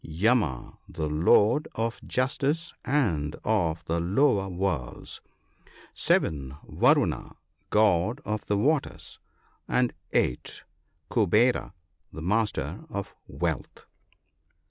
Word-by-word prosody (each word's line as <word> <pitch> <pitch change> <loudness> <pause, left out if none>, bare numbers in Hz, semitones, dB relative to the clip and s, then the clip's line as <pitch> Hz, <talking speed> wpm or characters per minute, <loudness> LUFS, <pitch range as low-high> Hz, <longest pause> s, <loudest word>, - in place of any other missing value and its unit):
Yama, 85 - 0
the 80 -3 -3
lord 100 - +3
of 115 +1 -2
justice 140 +5 -1
and 85 - 0
of 85 -7 0
the 85 +1 -1
lower 100 +3 +2
worlds. 90 -9 -3 0.7
7. 70 -3 0
Varuna, - - +2 0.3
God 105 +3 +3
of 105 0 -2
the 100 - +1
waters; 100 - -1 0.5
and 125 -1 +1 0.2
8. - - -1 0.5
Kuvera, 115 +1 +2 0.4
the 80 - -8
master 95 - -1
of 100 -6 -5
wealth. - - -4
100 Hz, 95 wpm, -27 LUFS, 80-120 Hz, 0.7 s, lord